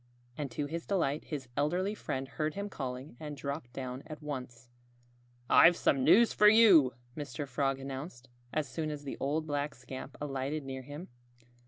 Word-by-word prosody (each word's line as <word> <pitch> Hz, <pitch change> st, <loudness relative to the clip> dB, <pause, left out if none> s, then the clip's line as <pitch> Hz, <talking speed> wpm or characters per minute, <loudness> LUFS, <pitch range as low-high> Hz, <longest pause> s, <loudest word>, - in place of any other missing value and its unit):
And 145 Hz, 0 st, -3 dB
to 145 Hz, +4 st, -3 dB
his 165 Hz, +3 st, -5 dB
delight 160 Hz, -7 st, 0 dB
his 140 Hz, -5 st, -5 dB
elderly 180 Hz, +8 st, +1 dB
friend 135 Hz, -10 st, -4 dB
heard 155 Hz, +3 st, -2 dB
him 200 Hz, +1 st, -3 dB
calling 130 Hz, -4 st, -5 dB
and 150 Hz, -2 st, -6 dB
dropped 140 Hz, -2 st, -5 dB
down 130 Hz, 0 st, -5 dB
at 155 Hz, -1 st, -7 dB
once. 130 Hz, -4 st, -6 dB, 0.8 s
"I've 170 Hz, +1 st, +7 dB
some 135 Hz, -2 st, +2 dB
news 200 Hz, -, +6 dB
for 210 Hz, -, +6 dB
you," 205 Hz, -, +7 dB, 0.2 s
Mr. 145 Hz, -1 st, -5 dB
Frog 135 Hz, 0 st, 0 dB
announced, 135 Hz, -1 st, -7 dB, 0.2 s
as 155 Hz, -2 st, -1 dB
soon 155 Hz, +5 st, -3 dB
as 150 Hz, -1 st, -5 dB
the 140 Hz, -, -5 dB
old 150 Hz, +3 st, 0 dB
black 145 Hz, -1 st, -2 dB
scamp 130 Hz, +2 st, -8 dB
alighted 140 Hz, +1 st, -2 dB
near 130 Hz, 0 st, -5 dB
him. 145 Hz, +7 st, -9 dB
145 Hz, 170 wpm, -32 LUFS, 130-155 Hz, 0.8 s, I've